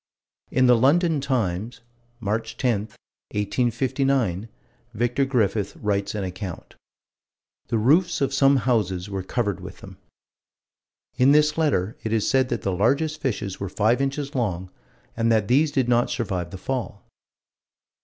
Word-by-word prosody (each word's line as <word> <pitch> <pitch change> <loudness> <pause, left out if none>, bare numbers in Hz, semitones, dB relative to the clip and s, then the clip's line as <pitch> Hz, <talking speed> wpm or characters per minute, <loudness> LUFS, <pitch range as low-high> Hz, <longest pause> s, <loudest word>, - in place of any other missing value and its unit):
In 130 0 +3
the 125 -1 +6
London 150 +5 +3
Times, 115 -3 -2 0.4
March 110 +1 -3
10, 120 -5 +1 0.6
1859, 120 -1 0 0.5
Vicar 120 +4 +1
Griffith 110 -6 0
writes 100 -1 -2
an 105 - -2
account: 95 -1 -7 0.9
"The 115 - 0
roofs 160 - +3
of 140 -1 0
some 135 0 +4
houses 100 -6 0
were 95 -1 -2
covered 100 0 -2
with - - -9
them." - - -12 1.2
In 130 +2 +5
this 150 0 +4
letter 130 - 0
it 110 - -4
is 110 -2 +1
said 130 -1 +2
that 100 - -3
the 100 - 0
largest 145 - +1
fishes 110 - -3
were 100 - -4
five 110 +7 +1
inches 140 +1 -2
long, 95 -8 -2 0.4
and 115 0 +1
that 110 -3 +2
these 145 +6 +3
did 130 -4 0
not 120 0 +2
survive 95 -7 -2
the 95 - -8
fall. 120 0 -4
120 Hz, 145 wpm, -24 LUFS, 100-135 Hz, 1.2 s, the